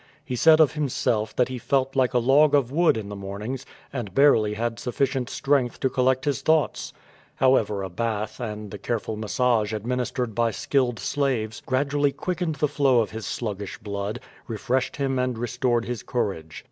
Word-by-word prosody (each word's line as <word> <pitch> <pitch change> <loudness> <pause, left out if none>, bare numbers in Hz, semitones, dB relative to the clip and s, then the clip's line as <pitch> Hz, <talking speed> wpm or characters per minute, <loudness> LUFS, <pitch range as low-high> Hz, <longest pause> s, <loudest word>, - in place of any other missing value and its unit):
He 125 - -3
said 155 +5 +6
of 155 -5 +5
himself 120 -7 -1
that 125 - +3
he 130 -1 -5
felt 135 +1 0
like 130 -3 +2
a - - +6
log 140 +5 +5
of 130 -3 +2
wood 165 -4 +3
in 105 -2 -5
the 100 - -6
morn 100 +1 -6
ings^ 130 +3 -4 0.3
and 110 -8 -5
barely 110 -7 +4
had 115 +1 -2
sufficient 130 0 -1
strength 135 -4 0
to 130 - +1
collect 130 0 +1
his 145 -3 0
thoughts. 160 -1 +1 0.5
However^ 110 -7 +2
a - - -6
bath 110 +3 -3
and 105 -4 -5
the 105 - -7
careful 110 +1 -3
massage 110 0 +1
admin 125 +4 -2
istered 125 -1 -3
by 115 +1 +2
skilled 120 +2 0
slaves 125 -6 -1
gradually 140 +2 +1
quickened 175 0 -2
the 150 +1 +1
flow 135 -4 +3
of 110 - -3
hid 110 -1 -6
sluggish 105 -4 -4
bloody 105 +2 -4 0.3
refreshed 125 +3 -1
him 135 -2 -1
and 125 -2 -1
restored 120 0 0
his 120 -4 -4
courage. 95 -11 -3
125 Hz, 185 wpm, -25 LUFS, 110-135 Hz, 0.5 s, said